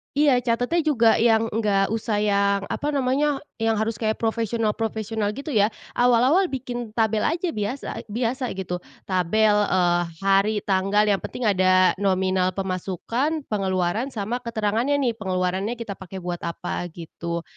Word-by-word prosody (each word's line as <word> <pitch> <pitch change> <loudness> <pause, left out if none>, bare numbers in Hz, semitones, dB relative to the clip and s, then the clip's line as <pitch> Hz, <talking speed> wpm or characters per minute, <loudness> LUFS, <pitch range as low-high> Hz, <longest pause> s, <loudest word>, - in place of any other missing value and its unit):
Iya 285 -3 +4
catatnya 245 +7 0
juga 235 -9 +3
yang 225 0 +3
enggak 205 -3 +1
usah 220 -2 -1
yang, 200 -1 +2
apa 290 - -2
namanya, 275 +2 +1 0.2
yang 225 0 +2
harus 220 0 -2
kayak 220 -1 0
profesional 225 -1 0
profesional 220 -1 -2
gitu 285 +2 -6
ya. 210 -3 +4 0.2
Awal-awal 250 +10 +4
bikin 245 -5 -5
tabel 220 -1 +2
aja 340 +1 -1
biasa 215 +6 -4
biasa 245 +4 -2
gitu. 180 -2 -4 0.2
Tabel, 195 +4 +2
eee, 180 -4 +2 0.2
hari, 195 +2 +3
tanggal, 195 +2 +2
yang 205 -2 +2
penting 250 - -6
ada 185 -3 +4
nominal 185 -1 +1
pemasukan, 195 - -2
pengeluaran, 190 +3 0
sama 235 -1 -3
keterangannya 230 +3 0
nih, 235 -3 -1
pengeluarannya 190 +2 -1
kita 225 -4 -7
pakai 190 0 -8
buat 175 -1 -3
apa, 175 +1 -4
gitu. 170 0 -5
215 Hz, 145 wpm, -24 LUFS, 190-240 Hz, 0.2 s, Iya